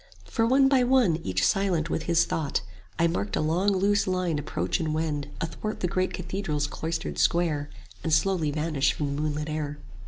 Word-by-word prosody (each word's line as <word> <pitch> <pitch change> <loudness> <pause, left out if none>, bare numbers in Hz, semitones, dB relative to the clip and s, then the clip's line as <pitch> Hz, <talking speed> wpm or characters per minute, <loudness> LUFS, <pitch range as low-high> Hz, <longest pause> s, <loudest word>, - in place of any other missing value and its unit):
For 225 -2 0
one 270 +2 +5
by 270 -2 +4
one, 245 -10 +4
each 95 - 0
silent 180 -5 +1
with - - -2
his 170 0 +4
thought, 150 -4 -1 0.4
I 170 - +3
marked 105 - -1
a - - 0
long 165 +6 +1
loose 200 +1 +2
line 180 -4 0
approach 95 - -2
and 155 -2 -1
wend 150 -3 -2
Athwart 190 +6 -4
the 180 - +1
great 185 +1 0
cathedral's 180 -5 -2
cloistered 160 +2 -4
square, 155 -4 +1 0.3
5 - - -23
And 160 - 0
slowly 165 -1 +2
vanish 145 -2 +1
from 140 -2 -2
the 145 - -2
moonlit 150 0 -2
air. 150 -1 -3
165 Hz, 190 wpm, -27 LUFS, 150-185 Hz, 0.4 s, one